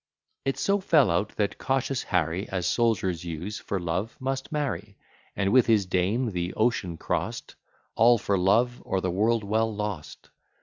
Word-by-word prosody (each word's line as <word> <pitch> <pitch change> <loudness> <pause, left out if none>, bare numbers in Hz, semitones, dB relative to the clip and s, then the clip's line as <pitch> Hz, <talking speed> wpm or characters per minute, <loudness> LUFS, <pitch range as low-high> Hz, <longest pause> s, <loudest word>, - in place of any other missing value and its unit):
It 135 - 0
so 200 +1 +1
fell 155 - +4
out 100 +5 -1
that 105 -2 -1
cautious 135 -1 0
Harry, 90 +1 -1
As 90 -2 -2
soldiers 95 -8 +1
use, 85 +5 -5
for 100 - -3
love 90 +6 -3
must 135 +1 -3
marry, 110 - -3 0.4
And, 100 -1 0
with 130 -2 +5
his 110 -4 +4
dame, 100 +7 0
the 90 -1 -3
ocean 105 -7 0
cross'd; - - -3 0.4
(All 120 +2 +5
for 100 -2 0
Love, 115 +7 +2
or 95 - -1
the 95 -1 -1
World 110 +4 +1
well 110 +2 +1
Lost!) 105 -7 -6
105 Hz, 165 wpm, -26 LUFS, 90-120 Hz, 0.4 s, with